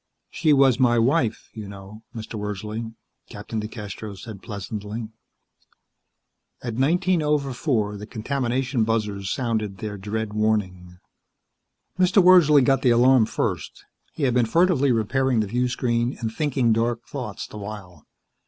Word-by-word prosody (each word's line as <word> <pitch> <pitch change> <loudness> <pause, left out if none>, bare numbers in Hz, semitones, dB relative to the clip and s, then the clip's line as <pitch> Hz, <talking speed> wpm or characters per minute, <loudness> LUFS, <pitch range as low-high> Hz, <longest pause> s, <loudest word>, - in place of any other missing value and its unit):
"She 155 - +1
was 135 -3 +4
my 120 -2 +4
wife, 120 0 +1
you 110 -2 -7
know, 100 +2 -11
Mr. 110 0 -7
Wordsley," 105 +2 -5 0.3
Captain 110 - -6
DeCastros 105 -2 -7
said 110 -5 -9
pleasantly. 105 +1 -6 1.5
At 120 -2 -3
nineteen 170 +8 +2
over 150 -3 0
four 110 -7 -1
the 105 +1 -9
contamination 125 +1 -1
buzzers 105 -3 -1
sounded 110 -5 -2
their 105 0 -6
dread 105 +2 -4
warning. 95 -5 -1 1.0
Mr. 185 +2 +4
Wordsley 175 -6 +7
got 135 +1 +2
the 130 - +3
alarm 120 -1 +5
first. - - -3 0.3
He 150 - -5
had 130 -3 +2
been 120 -2 +2
furtively 160 0 +3
repairing 125 +2 +1
the 110 - +1
viewscreen 120 +2 -1
and 115 -2 -3
thinking 130 -5 +1
dark 115 +1 -1
thoughts 120 -5 -6
the - - -11
while. 100 -6 -9
115 Hz, 135 wpm, -24 LUFS, 105-130 Hz, 1.5 s, Wordsley